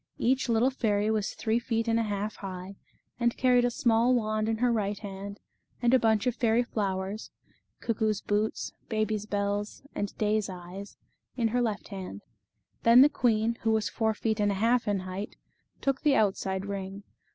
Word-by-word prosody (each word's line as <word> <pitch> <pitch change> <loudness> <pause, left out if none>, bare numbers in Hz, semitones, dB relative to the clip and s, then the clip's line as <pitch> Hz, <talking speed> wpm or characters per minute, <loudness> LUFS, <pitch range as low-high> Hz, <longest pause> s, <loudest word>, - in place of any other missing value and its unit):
Each 260 +1 +1
little 235 +3 +3
fairy 215 -4 +1
was 215 -2 -1
three 225 +1 +1
feet 230 -1 -1
and 230 0 +2
a - - +2
half 210 -1 -3
high, 190 0 -7 0.4
and 235 -1 +1
carried 250 -1 +4
a - - +3
small 235 +1 +3
wand 215 -1 0
in 225 - 0
her 245 +1 +2
right 205 -2 -1
hand, 200 0 -7 0.4
and 240 0 +2
a 260 - +7
bunch 220 -1 +2
of 250 -2 +1
fairy 235 0 +2
flowers 200 -2 -3 0.5
cuckoo's 220 -2 0
boots, 210 +1 -1 0.2
baby's 215 -2 -1
bells, 205 +1 -2
and 205 -1 -4
day's 210 -1 +1
eyes 185 +2 -9 0.4
in 230 -2 +2
her 245 +2 +1
left 220 -4 -2
hand. 185 - -7 0.6
Then 235 +2 +7
the 290 - +6
queen, 230 -4 +1
who 225 - +1
was 220 -1 +1
four 220 -2 0
feet 220 0 -1
and 205 -1 +3
a - - -1
half 230 +4 +2
in 200 -2 +1
height, 185 +2 -6 0.5
took 275 -1 0
the 295 -3 +4
outside 190 -3 +1
ring. 200 0 -5
215 Hz, 180 wpm, -29 LUFS, 200-235 Hz, 0.6 s, a